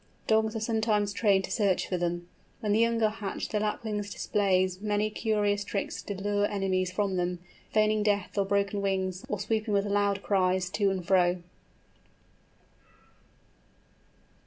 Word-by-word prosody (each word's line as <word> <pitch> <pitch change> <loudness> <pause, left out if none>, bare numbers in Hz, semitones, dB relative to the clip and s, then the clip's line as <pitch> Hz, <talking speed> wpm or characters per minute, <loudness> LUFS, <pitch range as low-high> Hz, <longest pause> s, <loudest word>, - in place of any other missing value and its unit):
Dogs 220 0 +2
are - - -1
sometimes 220 -2 +1
trained 200 -3 +3
to - - -6
search 200 -5 +1
for 185 - -1
them. 175 0 -2 0.3
When 210 - -1
the 210 - +3
young 230 0 +2
are 215 - +4
hatched 210 -3 -5
the 210 - +1
Lapwing 215 0 -2
displays 190 -2 0
many 210 0 0
curious 205 -2 0
tricks 200 -1 -3
to 205 - -5
lure 205 +1 0
enemies 185 -2 0
from 195 0 -1
them, 180 0 -1 0.3
feigning 215 0 +3
death 205 -2 0
or 200 -1 +2
broken 200 +1 0
wings, 190 -2 -1
or 210 - -2
swooping 215 -1 -1
with 200 0 +2
loud 200 -1 +1
cries 185 -2 +1
to 200 0 +2
and 190 -2 -3
fro. 180 -1 +3
205 Hz, 155 wpm, -28 LUFS, 190-215 Hz, 0.3 s, are